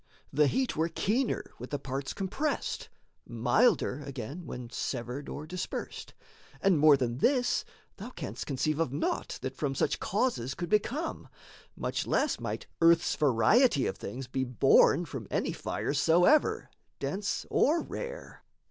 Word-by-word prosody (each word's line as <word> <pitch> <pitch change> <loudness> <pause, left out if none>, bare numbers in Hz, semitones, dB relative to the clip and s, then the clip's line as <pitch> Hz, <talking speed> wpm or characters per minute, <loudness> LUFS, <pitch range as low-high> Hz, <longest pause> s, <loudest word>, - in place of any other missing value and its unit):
The 150 +1 +4
heat 260 - 0
were 160 +2 +1
keener 230 +9 -1
with 125 - -7
the 145 - -2
parts 135 0 -4
compressed, 265 +10 -2 0.4
Milder, 125 - +2
again, 140 +5 -7
when 125 -1 -7
severed 125 +3 -4
or 150 - -6
dispersed 180 +3 -6 0.4
And 190 -5 +3
more 150 -1 +7
than 125 -1 -2
this 250 - +2 0.3
thou - - -7
canst - - -6
conceive 150 +2 -1
of 165 -6 0
naught 145 +4 -2
That 130 0 -4
from 135 -2 -2
such - - 0
causes 185 - -1
could 175 - -4
become; 270 - -1 0.5
much - - -2
less - - +1
Might - - -4 0.2
earth's 170 0 +5
variety 145 - +4
of - - -1
things 130 +2 -6
be 130 +1 -2
born 135 +5 +4
From 130 - -7
any - - 0
fires 140 - -2
soever, 175 - +3 0.3
dense 200 +2 -2
or 320 +4 +3
rare. - - -7
150 Hz, 145 wpm, -30 LUFS, 130-205 Hz, 0.5 s, more